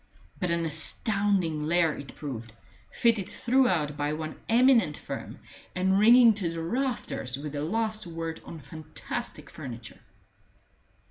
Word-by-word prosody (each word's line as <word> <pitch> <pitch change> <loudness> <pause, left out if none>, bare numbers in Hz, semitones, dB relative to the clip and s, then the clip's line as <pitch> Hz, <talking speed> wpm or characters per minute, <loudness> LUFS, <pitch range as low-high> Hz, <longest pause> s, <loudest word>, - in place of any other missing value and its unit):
But 180 - -1
an 170 0 0
astounding 165 0 0
lair 165 -2 +3
it 140 - -10
proved, 115 -6 -6 0.4
fitted 230 -5 +2
throughout 185 - +1
by 145 +1 -1
one 155 0 -5
eminent 230 - +4
firm, - - -7 0.4
and 190 +1 +2
ringing 235 +2 +8
to 195 -5 -1
the 165 0 -4
rafters 225 - -2
with 150 +1 -6
the 145 0 -3
last 215 +4 -1
word 165 -1 -5
on 165 - -9
fantastic 155 - -6
furniture. 120 -7 -8
165 Hz, 130 wpm, -28 LUFS, 150-215 Hz, 0.4 s, ringing